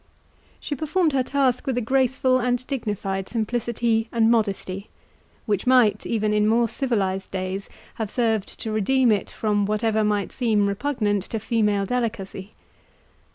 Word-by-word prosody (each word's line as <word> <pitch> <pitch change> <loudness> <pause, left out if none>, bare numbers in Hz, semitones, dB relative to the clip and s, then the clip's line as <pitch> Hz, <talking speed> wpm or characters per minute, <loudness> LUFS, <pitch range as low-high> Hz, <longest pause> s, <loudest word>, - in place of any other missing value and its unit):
She - - -4
performed 310 +3 0
her 265 - +3
task 265 0 0
with 260 -2 0
a - - +3
graceful 255 +1 +2
and 245 0 0
dignified 205 -7 -3
simplicity 230 0 -1
and 230 -1 +3
modesty, 200 -3 -1 0.6
which 205 0 -1
might, 235 -5 +4
even 215 -2 0
in 210 0 +3
more 230 +2 +3
civilized 195 -7 -1
days, 190 +1 -4 0.3
have 215 - -2
served 220 -4 -1
to 220 - -3
redeem 240 +4 +3
it 205 -2 0
from 205 -2 0
whatever 215 +1 +1
might 205 -2 0
seem 220 -5 +1
repugnant 205 -2 -1
to 225 - -4
female 210 -3 +1
delicacy. 215 -4 -3
220 Hz, 145 wpm, -24 LUFS, 205-245 Hz, 0.6 s, might